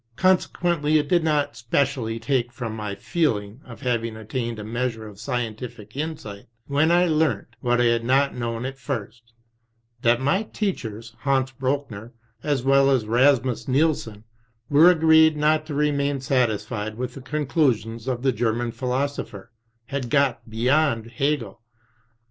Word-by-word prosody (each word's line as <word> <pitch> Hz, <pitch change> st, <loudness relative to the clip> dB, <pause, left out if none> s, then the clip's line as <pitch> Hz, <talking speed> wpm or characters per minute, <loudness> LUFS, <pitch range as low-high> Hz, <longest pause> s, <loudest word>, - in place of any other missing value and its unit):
Consequently 175 Hz, -3 st, +2 dB
it 150 Hz, -1 st, 0 dB
did 175 Hz, +1 st, +2 dB
not 150 Hz, -5 st, 0 dB
specially 120 Hz, -1 st, -1 dB
take 120 Hz, 0 st, 0 dB
from 115 Hz, -2 st, -5 dB
my 105 Hz, -2 st, -4 dB
feel 115 Hz, -, 0 dB
ing 105 Hz, +5 st, -10 dB
of 120 Hz, 0 st, -12 dB
having 115 Hz, -3 st, -1 dB
attained 115 Hz, +1 st, -4 dB
a 105 Hz, -, -6 dB
measure 115 Hz, 0 st, -3 dB
of 100 Hz, -2 st, -13 dB
scientific 115 Hz, -3 st, -5 dB
insight, 140 Hz, -10 st, -5 dB, 0.2 s
when 145 Hz, +4 st, +2 dB
I 175 Hz, +1 st, +4 dB
learnt 160 Hz, -2 st, +1 dB
— -, -, -32 dB
^what 120 Hz, 0 st, +2 dB
I -, -, +4 dB
had 115 Hz, 0 st, 0 dB
not 135 Hz, +3 st, +2 dB
known 115 Hz, 0 st, -3 dB
at 135 Hz, 0 st, -6 dB
first 115 Hz, 0 st, -6 dB, 0.4 s
— 115 Hz, 0 st, -42 dB
that 120 Hz, 0 st, +3 dB
my 145 Hz, +9 st, +1 dB
teachers, 115 Hz, -, -4 dB
Hans 135 Hz, +1 st, +1 dB
Brochner, 130 Hz, -4 st, -3 dB, 0.3 s
as 145 Hz, -3 st, -1 dB
well 135 Hz, 0 st, +4 dB
as 130 Hz, -5 st, +2 dB
Rasmus 125 Hz, +1 st, +2 dB
Nielsen, 130 Hz, -7 st, 0 dB, 0.5 s
were 155 Hz, +5 st, +7 dB
agreed 160 Hz, -2 st, +5 dB
not 155 Hz, +1 st, +2 dB
to 150 Hz, -, -4 dB
remain 145 Hz, -1 st, +1 dB
satisfied 110 Hz, -4 st, -1 dB
with 125 Hz, 0 st, -4 dB
the 135 Hz, -, -9 dB
conclusions 130 Hz, -6 st, -1 dB
of 125 Hz, -1 st, -2 dB
the 135 Hz, -, +3 dB
German 115 Hz, +1 st, -1 dB
phi 120 Hz, +2 st, -6 dB
losopher, 125 Hz, -6 st, -3 dB, 0.4 s
had 130 Hz, 0 st, -4 dB
got 125 Hz, -4 st, +1 dB
beyond 115 Hz, 0 st, +1 dB
Hegel." 130 Hz, -5 st, -2 dB
125 Hz, 155 wpm, -24 LUFS, 115-145 Hz, 0.5 s, were